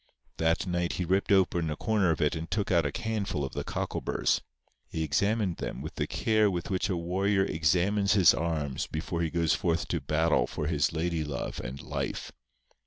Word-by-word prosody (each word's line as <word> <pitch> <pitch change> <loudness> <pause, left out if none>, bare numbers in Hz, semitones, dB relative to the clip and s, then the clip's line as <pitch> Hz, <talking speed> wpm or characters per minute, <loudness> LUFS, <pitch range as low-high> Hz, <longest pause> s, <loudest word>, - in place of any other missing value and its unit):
That 80 +2 +1
night 85 -1 -1
he 90 - -2
ripped 95 +4 +1
open 90 -4 +3
a 75 - -2
corner 105 0 +1
of 80 - 0
it 75 +1 +2
and 80 +1 -5
took 105 -2 -1
out 85 -2 +3
a 115 - -5
handful 105 -10 -1
of 65 - -7
the - - -3
cockleburrs. - - -1 0.5
He 80 - -2
examined 100 +2 +1
them - - -5
with - - -6
the - - -2
care 110 -2 +2
with 90 -1 -3
which 95 +2 0
a 90 - 0
warrior 95 +3 +1
examines 95 +6 +2
his 95 -6 +6
arms 75 -5 -2
before 85 +2 -3
he 80 - 0
goes 85 -1 +1
forth 85 +1 0
to 85 - -1
battle 75 -2 +2
for 75 - -4
his 75 -4 +1
lady 80 0 -1
love 70 -3 -4
and 65 +2 -6
life. - - -4
85 Hz, 195 wpm, -29 LUFS, 80-95 Hz, 0.5 s, his